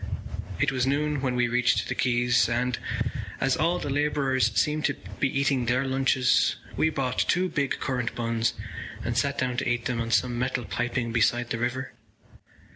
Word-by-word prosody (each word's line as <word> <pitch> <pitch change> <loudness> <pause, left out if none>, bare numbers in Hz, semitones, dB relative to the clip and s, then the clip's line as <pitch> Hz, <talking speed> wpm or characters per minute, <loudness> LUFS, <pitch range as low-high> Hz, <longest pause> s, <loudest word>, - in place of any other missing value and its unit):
It 145 -1 +2
was 130 -1 0
noon 145 +1 0
when 130 -2 0
we 125 -1 +2
reached 125 +1 +2
the - - -1
quays 120 -1 +2
and, 120 +1 0 0.6
as 135 -1 +2
all 170 +3 +1
the 145 - -3
labourers 135 -5 +1
seemed 150 +5 +1
to 145 - +1 0.2
be 140 - +3
eating 135 -2 +1
their 125 +3 +2
lunches, 130 -1 +2 0.2
we 160 - +2
bought 130 -4 -2
two 180 +2 +2
big 140 -4 -1
currant 125 -3 -2
buns 115 -1 0 0.5
and - - -2
sat - - +1
down 125 -1 -1
to 125 - 0
eat 120 -1 -1
them 120 -2 -1
on 115 - -3
some 120 0 +1
metal 125 -1 -1
piping 120 0 -2
beside 120 +1 +1
the 120 - -1
river. 125 +2 -2
125 Hz, 180 wpm, -26 LUFS, 120-135 Hz, 0.6 s, be